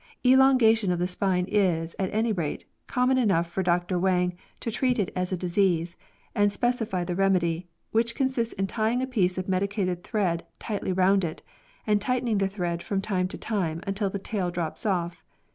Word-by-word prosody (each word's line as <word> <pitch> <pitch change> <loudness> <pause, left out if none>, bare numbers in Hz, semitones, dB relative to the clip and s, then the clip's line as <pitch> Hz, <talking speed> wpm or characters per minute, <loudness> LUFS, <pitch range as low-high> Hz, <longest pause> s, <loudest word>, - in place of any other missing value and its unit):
Elongation 250 -6 +5
of 175 - 0
the 175 - 0
spine 180 0 0
is, 175 -6 +1
at 190 -1 -1
any 220 +2 +1
rate, 170 -8 -3 0.2
common 255 +1 +2
enough 185 -8 +2
for 175 +3 -2
Dr 175 0 +1
Wang 180 -1 +1 0.2
to 230 - -3
treat 250 +2 +1
it 205 -5 0
as 180 0 -1
a 185 - 0
disease 175 -1 +1 0.4
and 205 0 +3
specify 225 -4 0
the 175 0 -3
remedy, 180 -3 +1 0.2
which 235 +1 +1
consists 260 -4 -1
in 195 - 0
tying 225 +5 0
a - - +1
piece 190 -9 0
of 185 - -3
medicated 185 -2 -1
thread 185 -7 -1
tightly 205 -3 -3
round 190 +1 +3
it, 160 -2 -4 0.4
and 210 -1 +2
tightening 240 -2 0
the 195 - +2
thread 175 -3 -3
from 195 +2 -2
time 190 -2 0
to - - -7
time 175 -7 -2
until 195 0 -1
the 200 - -3
tail 195 -2 -2
drops 170 +1 -4
oflf. 175 -4 -1
195 Hz, 185 wpm, -26 LUFS, 180-220 Hz, 0.4 s, Elongation